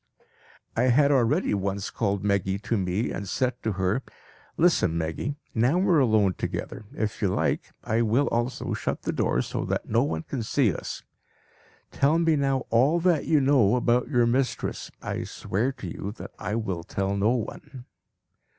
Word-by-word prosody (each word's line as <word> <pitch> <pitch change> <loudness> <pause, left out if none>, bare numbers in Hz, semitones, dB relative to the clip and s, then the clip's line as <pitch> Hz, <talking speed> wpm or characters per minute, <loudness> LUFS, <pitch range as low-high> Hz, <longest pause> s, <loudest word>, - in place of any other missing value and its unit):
I 120 - +2
had 140 +3 +4
already 140 - +2
once 100 0 -2
called 100 -3 -1
Meggy 100 -1 +1
to 115 - 0
me 95 +2 -1
and 100 -2 -5
said 125 -1 -1
to 110 - -1
her, 95 +6 0 0.6
"Listen, 160 - +3
Meggy! 80 - -2 0.2
Now 120 +9 +2
we 185 - +1
are 165 -4 +5
alone 110 -7 +3
together; 110 - -5
if 110 0 -3
you 100 - +3
like, 90 - 0
I 115 +1 +1
will 115 +5 +2
also 120 +2 -1
shut - - -3
the - - -1
door 60 - +1
so - - -3
that - - -2
no - - +2
one 80 0 -1
can 130 - -4
see 115 - +2
us. - - -6 0.9
Tell 145 +4 +2
me 165 -1 +3
now 135 -3 0
all 135 +9 +4
that 170 -4 +2
you 155 - +4
know 130 -6 +4
about 120 0 +2
your 120 -4 +3
mistress. 125 +2 -1
I - - -3
swear 115 +8 -2
to 120 -8 -8
you 95 +4 -5
that - - -9
I 105 +1 -3
will 95 -7 -2
tell 95 +2 -2
no 105 +5 +2
one." 125 +3 -6
115 Hz, 180 wpm, -26 LUFS, 100-135 Hz, 0.9 s, are